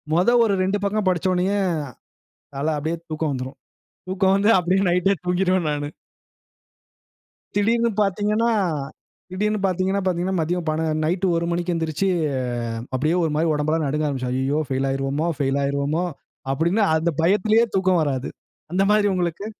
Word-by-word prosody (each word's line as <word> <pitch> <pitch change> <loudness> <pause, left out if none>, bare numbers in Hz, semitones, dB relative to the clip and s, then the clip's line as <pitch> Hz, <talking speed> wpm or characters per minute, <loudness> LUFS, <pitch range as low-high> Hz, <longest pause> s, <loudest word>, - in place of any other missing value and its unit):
மொத 180 +6 +3 0.2
ஒரு 200 -3 +1
2 195 +2 0
பக்கம் 205 0 0
படிச்ச 180 0 0
உடனேயே 185 +3 +1 1.0
அத 150 - -1
அப்படியே 160 +3 -2
தூக்கம் 155 -1 -2
வந்துரும். 130 +1 -6 0.5
தூக்கம் 190 0 +2
வந்து 205 +3 +4
அப்படியே 180 +2 +1
நைட்டே 180 +3 +2
தூங்கிருவேன் 180 -1 +1
நானு. 145 0 -3 1.7
திடீர்ன்னு 230 +3 +2
பார்த்தீங்கன்னா, 210 +3 +1 0.8
திடீர்ன்னு 210 +3 -1
பார்த்தீங்கன்னா 190 +1 0
பார்த்தீங்கன்னா, 185 +1 0
மதியம் 170 +1 -2
பண 155 +1 -1 0.2
நைட் 180 +4 0
1 170 0 0
மணிக்கு 175 +1 -1
எந்திரிச்சு, 165 +4 -1 0.6
அ - - -3 0.2
அப்படியே 155 +6 +1
ஒரு 160 - 0
மாரி 160 +2 +1
உடம்பெல்லாம் 155 +1 0
நடுங்க 150 +2 -1
ஆரம்பிச்சிரும். 130 -3 -2
ஐய்யய்யோ 135 +4 0
பெயில் 135 +1 0
ஆயிருவோமோ, 135 +4 -1
பெயில் 135 +1 +1
ஆயிருவோமோ 140 +4 0 0.5
அப்படின்னு 170 +9 +1
அந்த 165 +2 +1
பயத்திலேயே 210 +6 +3
தூக்கம் 185 -2 +3
வராது. 135 -3 -2 0.4
அந்த 190 +2 +2
மாரி 210 -1 +4
உங்களுக்கு? 180 +2 -2
175 Hz, 145 wpm, -22 LUFS, 155-195 Hz, 1.7 s, வந்து